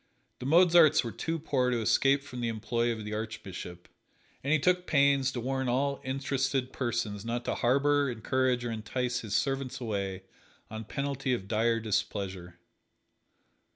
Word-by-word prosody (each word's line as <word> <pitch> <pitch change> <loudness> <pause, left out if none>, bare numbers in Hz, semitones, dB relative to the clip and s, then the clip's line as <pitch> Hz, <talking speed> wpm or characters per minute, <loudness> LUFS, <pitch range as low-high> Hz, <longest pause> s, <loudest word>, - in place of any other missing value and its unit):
The 125 - -4
Mozarts 165 -1 +6
were 115 - -4
too 165 +7 -3
poor 135 -5 0
to 120 -1 0
escape 135 +5 +3
from 125 -3 -7
the 120 - 0
employ 115 +2 -1
of 110 -2 -5
the 105 - -5
Archbishop, 100 -5 -6 0.6
and 140 - -1
he 155 - +5
took 180 +4 +1
pains 140 -2 +3
to 125 - -4
warn 130 +1 -1
all 140 +3 0
interested 135 -1 -1
persons 115 -5 -2
not 120 +1 -3
to - - 0
harbor, 140 +3 +2
encourage 125 +1 0
or 120 - -2
entice 120 +3 -2
his 110 -5 -4
servants 135 -2 -1
away 100 -5 -3 0.5
on 110 0 -6
penalty 135 0 -1
of 95 -5 -7
dire 115 +2 +1
displeasure. 100 -4 -3
125 Hz, 155 wpm, -29 LUFS, 110-140 Hz, 0.6 s, Mozarts